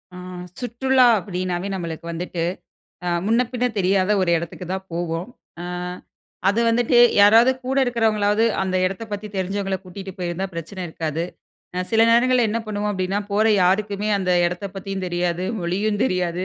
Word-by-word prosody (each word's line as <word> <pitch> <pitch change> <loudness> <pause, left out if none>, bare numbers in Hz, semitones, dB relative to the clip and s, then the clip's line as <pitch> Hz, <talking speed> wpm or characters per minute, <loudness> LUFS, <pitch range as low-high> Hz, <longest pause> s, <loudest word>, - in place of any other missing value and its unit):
ஆ - - -8 0.4
சுற்றுலா 255 +2 +2
அப்படினாவே 185 -1 -3
நம்மளுக்கு 170 -3 -5
வந்துட்டு 170 0 -3 0.6
அ - - +1 0.2
முன்ன, 230 +3 +3
பின்ன 250 0 -1
தெரியாத 190 0 +2
ஒரு 180 - +1
இடத்துக்கு 170 +2 -6
தான் 190 0 -4
போவோம். 170 +2 -3 0.3
ஆ - - -5 0.8
அது 205 +4 +2
வந்துட்டு 240 +1 +3 0.2
யாராவது 225 +5 +7
கூட 265 +1 -1
இருக்கிறவங்களாவது 220 -3 +2 0.2
அந்த 185 -1 -1
இடத்தப் 205 +4 -5
பத்தி 205 +1 -4
தெரிஞ்சவங்கள 195 +1 -1
கூட்டிட்டு 190 +1 -8
போயிருந்தா 180 +1 -2
பிரச்சன 175 +3 -6
இருக்காது. 160 0 -3 0.7
சில 225 -1 +4
நேரங்கள்ள 250 +2 +4
என்ன 220 +2 -1
பண்ணுவோ 210 -1 -2
அப்பிடின்னா 190 0 -1
போற 215 +2 +3 0.2
யாருக்குமே 200 +3 +1
அந்த 185 -2 -1 0.2
எடத்த 180 +3 -4
பத்தியு 195 0 -5
தெரியாது, 175 0 -1 0.2
மொழியு 185 +5 0
தெரியாது 180 -5 -1
195 Hz, 145 wpm, -22 LUFS, 180-215 Hz, 0.8 s, யாராவது